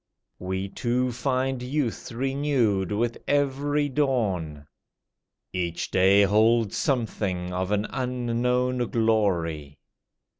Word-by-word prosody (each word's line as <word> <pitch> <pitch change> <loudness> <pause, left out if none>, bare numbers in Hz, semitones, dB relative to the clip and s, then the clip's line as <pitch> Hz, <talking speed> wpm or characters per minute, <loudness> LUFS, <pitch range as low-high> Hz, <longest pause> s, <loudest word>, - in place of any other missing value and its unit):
We 95 +1 -3
two 125 +5 -1
find 130 +1 -1
youth 125 -2 -2
renewed 125 -6 0
with 115 +3 -1
every 145 +1 +1
dawn; 105 - -1 0.9
Each 85 -2 -3
day 95 +2 +5
holds 110 +2 +3
something 100 -8 -1
of 90 +1 -2
an 105 0 +1
unknown 125 0 0
glory. 85 - 0
115 Hz, 90 wpm, -25 LUFS, 95-130 Hz, 0.9 s, day